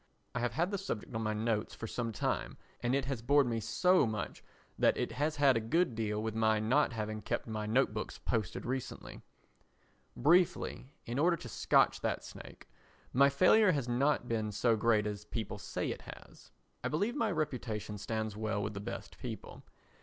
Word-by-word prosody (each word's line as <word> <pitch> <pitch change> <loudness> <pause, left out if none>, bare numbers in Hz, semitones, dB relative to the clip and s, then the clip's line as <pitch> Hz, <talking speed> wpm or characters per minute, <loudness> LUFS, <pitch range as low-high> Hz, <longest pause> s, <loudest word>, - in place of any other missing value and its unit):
I 125 - -1
have 120 -1 -1
had 170 - 0
the 200 - -1
subject 130 - -5
on 110 - -2
my 110 -1 -1
notes 110 0 -1
for - - -6
some 115 +1 -3
time 105 - -2 0.2
and 120 +2 +1
it 140 -1 0
has 130 -3 -3
bored 140 +3 +4
me 115 -2 -1
so 155 - +3
much 110 -2 -4 0.4
that - - +4
it - - -1
has 150 +3 -1
had 140 -3 +5
a - - +3
good 125 +7 +1
deal 110 -2 -2
to - - -1
do - - -5
with 110 -1 -2
my 110 -1 +2
not 130 +5 +2
having 110 -1 -3
kept - - -2
my 110 -2 -4
Note 120 +1 +2
Books 105 - -4
posted 110 -6 -2
recently. 130 +1 -5 1.0
Briefly, 170 -1 +2 0.2
in 120 +3 -3
order 170 +3 +3
to 125 - -9
scotch - - +3
that - - -1
snake, - - -11 0.5
my 140 +2 +6
failure 185 +7 +5
has 140 -5 -1
not 125 +1 +1
been 110 -2 -1
so 115 +3 +2
great 110 -1 +3
as 105 0 -4
people 110 0 -4
say - - -3
it - - -6
has. - - -12 0.3
I - - 0
believe 205 - 0
my 230 -6 +1
reputation 120 - -3
stands 110 0 -3
well 110 -1 -1
with 105 +1 -3
the 100 - -5
best 100 - -7
people. - - -7
115 Hz, 200 wpm, -33 LUFS, 110-140 Hz, 1.0 s, my